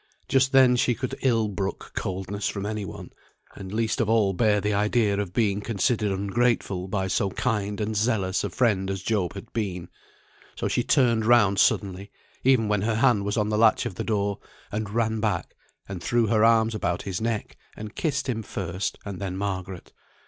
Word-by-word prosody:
Just 135 Hz, 0 st, +3 dB
then 130 Hz, -2 st, +6 dB
she 120 Hz, -1 st, +2 dB
could 130 Hz, +1 st, -4 dB
ill 115 Hz, -5 st, +2 dB
brook 95 Hz, -1 st, -4 dB
coldness 95 Hz, +2 st, -3 dB
from 100 Hz, -1 st, -3 dB
any 105 Hz, -1 st, -3 dB
one, -, -, -9 dB, 0.4 s
and 95 Hz, -2 st, -9 dB
least 115 Hz, +3 st, 0 dB
of 110 Hz, -, 0 dB
all 110 Hz, -4 st, +3 dB
bear 105 Hz, +1 st, +2 dB
the 105 Hz, +1 st, -1 dB
idea 105 Hz, 0 st, +1 dB
of 100 Hz, -4 st, -3 dB
being 105 Hz, -1 st, +1 dB
considered 110 Hz, 0 st, 0 dB
ungrateful 100 Hz, -1 st, 0 dB
by 95 Hz, 0 st, -1 dB
so 95 Hz, +1 st, 0 dB
kind 105 Hz, -1 st, -2 dB
and 110 Hz, 0 st, -2 dB
zealous 100 Hz, -4 st, 0 dB
a -, -, -2 dB
friend 100 Hz, -6 st, +1 dB
as 95 Hz, -1 st, -4 dB
Job 100 Hz, -4 st, -1 dB
had 100 Hz, -, -10 dB
been; 90 Hz, -6 st, -3 dB, 0.7 s
so -, -, -2 dB
she -, -, +1 dB
turned 120 Hz, -4 st, +3 dB
round 105 Hz, -5 st, +5 dB
suddenly, 100 Hz, 0 st, +1 dB, 0.3 s
even 130 Hz, -4 st, +4 dB
when 105 Hz, -1 st, +1 dB
her 110 Hz, +2 st, 0 dB
hand 115 Hz, -3 st, +3 dB
was 105 Hz, +3 st, -1 dB
on 105 Hz, -1 st, +1 dB
the 105 Hz, 0 st, 0 dB
latch 115 Hz, +1 st, +4 dB
of 120 Hz, -, -3 dB
the -, -, -4 dB
door, 100 Hz, -2 st, -1 dB, 0.3 s
and 105 Hz, 0 st, -3 dB
ran 110 Hz, 0 st, 0 dB
back, 105 Hz, -1 st, -2 dB, 0.3 s
and 95 Hz, -3 st, -6 dB
threw 120 Hz, +6 st, +2 dB
her 110 Hz, 0 st, +2 dB
arms 115 Hz, 0 st, +4 dB
about 90 Hz, -5 st, -2 dB
his 95 Hz, -1 st, -4 dB
neck, 115 Hz, -2 st, -2 dB, 0.2 s
and 105 Hz, 0 st, -7 dB
kissed 140 Hz, -4 st, -1 dB
him 115 Hz, -3 st, -1 dB
first, 95 Hz, -2 st, -4 dB
and 100 Hz, -3 st, -6 dB
then 95 Hz, -2 st, -4 dB
Margaret. 95 Hz, -2 st, -5 dB
105 Hz, 190 wpm, -25 LUFS, 100-115 Hz, 0.7 s, then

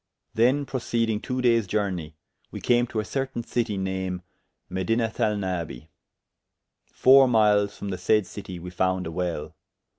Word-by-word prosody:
Then 125 Hz, +5 st, +3 dB
proceedyng 115 Hz, -4 st, -1 dB
two 125 Hz, -1 st, -3 dB
dayes 115 Hz, -4 st, +3 dB
journey, 90 Hz, -6 st, -2 dB, 0.3 s
we -, -, -7 dB
came 120 Hz, 0 st, +2 dB
to 115 Hz, -, -3 dB
a -, -, 0 dB
certayne 135 Hz, 0 st, -3 dB
citie 110 Hz, -4 st, -1 dB
name 95 Hz, -1 st, -3 dB, 0.4 s
Medinathalnabi: 95 Hz, -, -1 dB, 1.0 s
four 135 Hz, +1 st, +6 dB
myles 105 Hz, -3 st, +3 dB
from 100 Hz, -, -5 dB
the 90 Hz, -2 st, -4 dB
said 105 Hz, +2 st, +2 dB
citie, 95 Hz, -2 st, -8 dB
we 90 Hz, +1 st, -8 dB
founde 95 Hz, +1 st, 0 dB
a 80 Hz, -, -4 dB
well. 85 Hz, -3 st, -3 dB
105 Hz, 140 wpm, -25 LUFS, 90-120 Hz, 1.0 s, four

